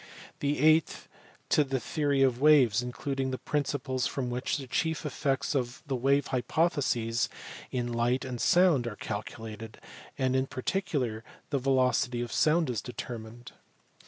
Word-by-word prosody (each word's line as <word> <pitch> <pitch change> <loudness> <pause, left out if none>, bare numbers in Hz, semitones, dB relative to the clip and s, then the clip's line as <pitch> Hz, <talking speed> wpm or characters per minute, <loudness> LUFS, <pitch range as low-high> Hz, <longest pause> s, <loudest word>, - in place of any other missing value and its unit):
The 145 +1 0
eighth 155 +1 +3 0.4
to 150 - +4
the 135 -1 -2
theory 140 +2 +1
of 130 -1 +1
waves, 135 -7 +5
including 135 +2 -3
the 130 - -3
principles 140 -3 -1
from 125 -3 -3
which 125 +4 -1
the 135 - -6
chief 160 +5 -1
effects 140 -2 -1
of 125 -3 -2
the 140 -3 -2
wave 135 +3 +2
hypotheses 130 -4 0 0.4
in 120 -2 -2
light 120 +3 +1
and 125 -2 -5
sound 175 -9 +4
are 110 - -5
calculated, 110 +1 -7 0.4
and 130 -1 +1
in 130 0 +1
particular 130 - -2 0.3
the 140 - +1
velocity 125 -2 +1
of 120 - -4
sound 160 +1 +3
is 115 - -2
determined. 120 -1 -8
130 Hz, 145 wpm, -29 LUFS, 120-145 Hz, 0.4 s, waves